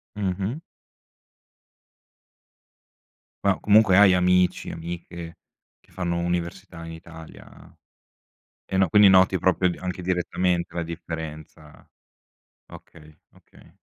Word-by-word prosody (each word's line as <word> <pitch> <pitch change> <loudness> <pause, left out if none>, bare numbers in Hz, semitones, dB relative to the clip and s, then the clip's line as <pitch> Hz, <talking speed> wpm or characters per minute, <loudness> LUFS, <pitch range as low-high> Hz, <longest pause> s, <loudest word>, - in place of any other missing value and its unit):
Mh-mh. 100 - -3 2.9
Ma, 100 -2 +2
comunque, 105 -2 +4
hai 100 -1 +7
amici, 90 0 +2
amiche, 85 0 -8 0.4
che - - -29
fanno 85 -2 -2
università 85 -1 -4
in 80 - -8
Italia 80 -1 -14 0.9
e, 95 - -4
no 95 -1 +3
quindi, 105 +3 +6
noti, 95 0 +4
proprio, 90 +1 +2
anche 90 -1 -5
direttamente, 90 -1 -1
la 85 - -2
differenza, 80 -2 -9 0.9
okay 75 -1 -15
okay. - - -22
90 Hz, 95 wpm, -24 LUFS, 85-95 Hz, 2.9 s, hai